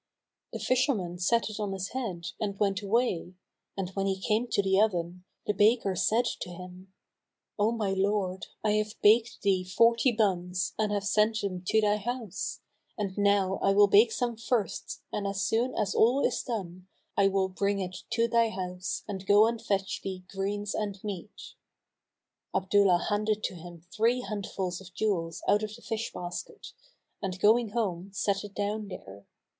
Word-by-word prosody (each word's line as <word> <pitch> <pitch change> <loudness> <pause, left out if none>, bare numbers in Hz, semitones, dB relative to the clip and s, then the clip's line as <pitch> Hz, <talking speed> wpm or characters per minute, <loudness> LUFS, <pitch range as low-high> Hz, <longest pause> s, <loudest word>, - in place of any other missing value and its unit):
The - - -4
fisherman 240 -9 0
set 230 +6 +2
it 215 - -7
on 205 -2 -2
his 190 0 -4
head 205 -10 -4
and 200 -2 -2
went 200 -1 +1
away; 200 -4 0 0.4
and, 190 -2 -2
when 195 0 -1
he 190 -1 -1
came 215 +5 0
to 200 - +1
the 190 +1 +3
oven, 180 -3 -1 0.2
the 210 - +1
baker 205 -1 +3
said 225 +7 +2
to - - -5
him, 180 +1 -10 0.7
"O 210 +2 +3
my 215 -4 -1
lord, 190 -1 0 0.2
I 215 - +2
have 215 +1 -2
baked 225 +3 +4
thee 190 -2 +2
forty 230 +6 +4
bunns[FN#247] 185 -5 0
and 215 -1 +1
have 205 -1 0
sent 215 +2 +2
them 185 -3 -3
to 220 - +4
thy 210 0 +3
house; 220 -2 -4 0.4
and 195 -3 -3
now 200 -2 +2
I 195 - +3
will 205 +1 +7
bake 210 +3 +6
some 240 0 -1
firsts 230 -2 -2
and 200 -1 -1
as 195 -1 -1
soon 240 +3 +1
as 210 -2 0
all 245 +5 +4
is - - 0
done, 185 -6 -5 0.3
I 200 - +4
will 195 -1 +1
bring 200 +2 0
it 185 -1 -4 0.2
to 230 0 +3
thy 230 -1 +3
house 185 -2 -4
and 190 -2 -6
go 205 +1 +7
and 230 0 -1
fetch 195 -3 -1
thee 190 -1 -5
greens 200 +1 -2
and 205 -2 -2
meat." 210 - -7 1.0
Abdullah 190 -2 +3
handed 210 +1 0
to - - -1
him 170 -1 -11
three 235 +3 +2
handfuls 195 -5 -4
of 185 -1 -14
jewels 170 -7 -1
out 205 +2 +4
of 215 0 -4
the 235 - -16
fish 225 0 -3
basket 175 0 -7 0.5
and 185 -2 -3
going 220 +3 +4
home, 200 -5 -2
set 200 +1 0
it 205 0 -10
down 210 +1 -2
there. 100 - -10
200 Hz, 175 wpm, -29 LUFS, 185-220 Hz, 1.0 s, will